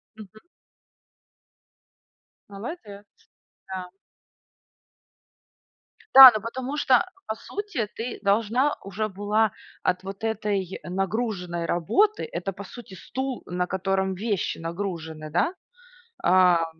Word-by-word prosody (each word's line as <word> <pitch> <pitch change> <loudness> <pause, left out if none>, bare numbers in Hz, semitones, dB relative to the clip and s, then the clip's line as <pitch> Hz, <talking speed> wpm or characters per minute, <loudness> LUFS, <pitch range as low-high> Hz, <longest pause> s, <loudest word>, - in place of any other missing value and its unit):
Мгм. 215 0 -13 2.1
Молодец. 205 - -8 0.6
Да. 185 -1 -6 2.2
Да, 265 -1 +13
ну 215 - -1
потому 260 +5 -4
что 265 +3 +4 0.2
по 220 - -2
сути 390 - -4
ты 235 +2 -5
должна 225 +7 +2
уже 200 +2 -3
была 205 +2 +1 0.3
от 185 +1 0
вот 195 +2 -8
этой 205 -4 -2
нагруженной 185 -2 -2
работы 395 - +1
это 195 - -3
по 200 - -9
сути 200 0 -11
стул, 260 +7 -5
на 180 0 -2
котором 190 0 -1
вещи 205 -1 -2
нагружены, 165 -3 -5
да, 180 - +1 0.7
ам, 180 -2 +5
200 Hz, 100 wpm, -25 LUFS, 185-230 Hz, 2.2 s, Да